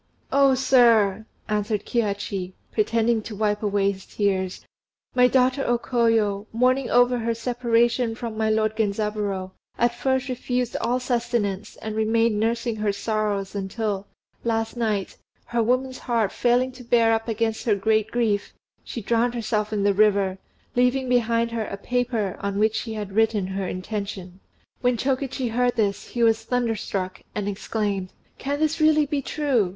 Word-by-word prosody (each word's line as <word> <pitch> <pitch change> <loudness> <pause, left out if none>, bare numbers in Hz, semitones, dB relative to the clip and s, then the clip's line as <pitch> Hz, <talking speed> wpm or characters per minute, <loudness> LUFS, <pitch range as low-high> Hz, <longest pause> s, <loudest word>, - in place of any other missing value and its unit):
"Oh! 275 -1 +5
sir," 230 -6 +4 0.2
answered 210 0 -1
Kihachi, 200 -4 -2 0.2
pretending 225 +1 +1
to 215 0 -8
wipe 210 0 0
away 200 -1 +2
his 190 -1 -11
tears, 190 -3 -1 0.5
"my 250 0 +5
daughter 260 +1 +2
O 240 - +2
Koyo, 225 -4 +1
mourning 255 +3 +2
over 245 0 +4
her 230 0 -1
separation 235 0 +1
from 230 -2 -5
my 220 0 0
lord 215 0 +1
Genzaburô, 205 -3 -1 0.3
at 240 0 +2
first 260 +1 0
refused 250 -1 -2
all 250 +2 +1
sustenance, 230 -5 -1
and 220 -1 -6
remained 220 0 +2
nursing 230 +1 0
her 210 -1 +1
sorrows 205 -1 -2
until, 200 0 -3 0.4
last 225 0 -1
night, 215 -5 -1 0.3
her 235 -1 0
woman's 255 +3 0
heart 230 -5 0
failing 250 +1 +2
to 250 0 -12
bear 230 -1 +3
up 225 +1 -1
against 225 0 -1
her 215 -4 +3
great 215 +1 +1
grief, 220 -4 0 0.3
she 235 - -6
drowned 235 +3 +1
herself 215 -2 -1
in 205 -2 0
the 200 0 +3
river, 200 -2 +2 0.4
leaving 250 +2 +2
behind 235 -1 +2
her 230 -2 -2
a 200 - -6
paper 235 -3 -1
on 200 0 -3
which 215 +1 +3
she 220 0 -3
had 205 -2 -5
written 215 -1 +2
her 190 0 -3
intention." 190 -1 -5 0.4
When 245 -1 +2
Chokichi 265 0 -1
heard 245 +1 +1
this, 205 -3 0
he 240 - -1
was 225 -1 +3
thunderstruck, 220 -6 -2
and 205 -1 -2
exclaimed, 200 -2 -2 0.3
"Can 285 +2 -2
this 310 +1 0
really 310 -1 +5
be 285 -1 -1
true! 270 -9 0
225 Hz, 155 wpm, -24 LUFS, 205-245 Hz, 0.5 s, Oh